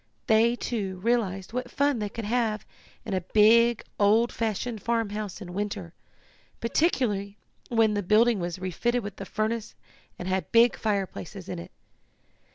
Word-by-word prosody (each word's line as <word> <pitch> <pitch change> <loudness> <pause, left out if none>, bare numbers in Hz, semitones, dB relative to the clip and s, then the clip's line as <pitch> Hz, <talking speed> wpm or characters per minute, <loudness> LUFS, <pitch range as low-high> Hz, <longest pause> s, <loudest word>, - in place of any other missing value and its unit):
They, 230 +1 +4
too, 200 -7 -3
realized 210 -5 0
what 250 0 -3
fun 280 -1 +1
they 210 -1 -2
could 230 +1 -6
have 220 -2 0 0.4
in 215 - -3
a 185 - 0
big, 225 +5 +4 0.2
old 220 +4 +4
fashioned 225 0 -2
farmhouse 215 -3 -2
in 175 -2 -8
winter, 200 -3 -4 0.7
particularly 225 - 0 0.3
when 225 -2 +3
the 205 - 0
building 215 +3 +4
was 175 0 -3
refitted 220 +7 -1
with 200 -1 -7
a - - -4
furnace, 215 +2 -2 0.4
and 180 - -6
had 190 0 -1
big 235 +1 +5
fireplaces 195 -2 -3
in 180 -2 -5
it. - - -9
215 Hz, 150 wpm, -27 LUFS, 195-235 Hz, 0.7 s, big